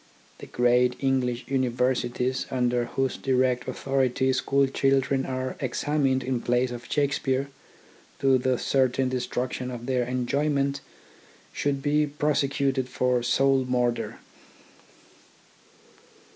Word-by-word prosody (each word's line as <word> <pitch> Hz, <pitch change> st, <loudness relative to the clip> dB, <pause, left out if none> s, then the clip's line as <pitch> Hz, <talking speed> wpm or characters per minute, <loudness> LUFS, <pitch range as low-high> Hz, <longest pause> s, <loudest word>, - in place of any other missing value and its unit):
The -, -, -9 dB
great 125 Hz, 0 st, +2 dB
English 130 Hz, -2 st, 0 dB
Universities, 125 Hz, -1 st, 0 dB
under 125 Hz, -1 st, 0 dB
whose 135 Hz, +2 st, -2 dB
direct 130 Hz, -1 st, +1 dB
authority 130 Hz, -1 st, 0 dB
school 140 Hz, +2 st, +2 dB
children 135 Hz, 0 st, +1 dB
are 130 Hz, 0 st, -3 dB
ex 130 Hz, -3 st, -3 dB
amined 135 Hz, -3 st, +1 dB
in 125 Hz, -1 st, -2 dB
plays 125 Hz, +1 st, +1 dB
of 120 Hz, -1 st, -8 dB
Shakespeare, 140 Hz, -2 st, 0 dB, 0.7 s
to 135 Hz, -1 st, +3 dB
the 130 Hz, 0 st, +1 dB
certain 130 Hz, 0 st, +1 dB
destruction 125 Hz, 0 st, -3 dB
of 120 Hz, -1 st, -7 dB
their 125 Hz, -1 st, +1 dB
enjoyment, 140 Hz, +3 st, 0 dB, 0.7 s
should 140 Hz, -1 st, -1 dB
be 150 Hz, +1 st, +2 dB
pro 150 Hz, +1 st, 0 dB
secuted 135 Hz, -2 st, 0 dB
for 125 Hz, -1 st, +1 dB
soul 135 Hz, +2 st, +2 dB
murder. 125 Hz, -1 st, -1 dB
130 Hz, 115 wpm, -26 LUFS, 125-135 Hz, 0.7 s, to